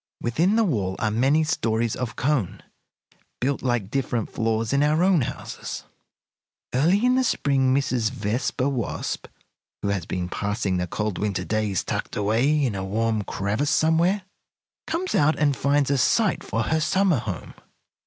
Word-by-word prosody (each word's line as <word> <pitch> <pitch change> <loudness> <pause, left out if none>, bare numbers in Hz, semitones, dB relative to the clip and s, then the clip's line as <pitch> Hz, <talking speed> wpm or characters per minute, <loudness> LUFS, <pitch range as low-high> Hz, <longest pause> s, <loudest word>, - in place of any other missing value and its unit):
Within 165 - +1
the 230 - +4
wall 100 - 0
are 105 - 0
many 135 +8 +3
stories 115 -6 0
of 125 -3 -4
cone, 135 - -1 0.8
built 135 +2 0
like 120 -6 -1
different 125 -4 -1
floors 115 +1 -1
in 140 - +3
our 155 +3 +3
own 185 -5 +4
houses. 115 - -5 0.9
"Early 175 - +3
in 250 - +4
the 260 0 +3
spring 135 - +2
Mrs. 130 -4 +1
Vespa 125 +3 -1
Wasp, 130 -6 -3 0.6
who 100 - 0
has 95 -4 -2
been 90 -1 -2
passing 100 0 -1
the 90 0 -1
cold 105 0 -3
winter 100 -3 -1
days 105 -3 0
tucked - - -3
away 125 +9 +2
in 120 - -1
a 95 -1 -3
warm 110 +2 0
crevice 100 +10 -1
somewhere, 165 +6 +2 0.6
comes 340 +4 -2
out 155 +2 +3
and 145 -2 +2
finds 140 +1 +1
a 140 - +2
site 210 - +2
for 115 - -1
her 160 +7 +1
summer 175 -1 +2
home. 100 -7 -6
125 Hz, 160 wpm, -24 LUFS, 110-150 Hz, 0.9 s, the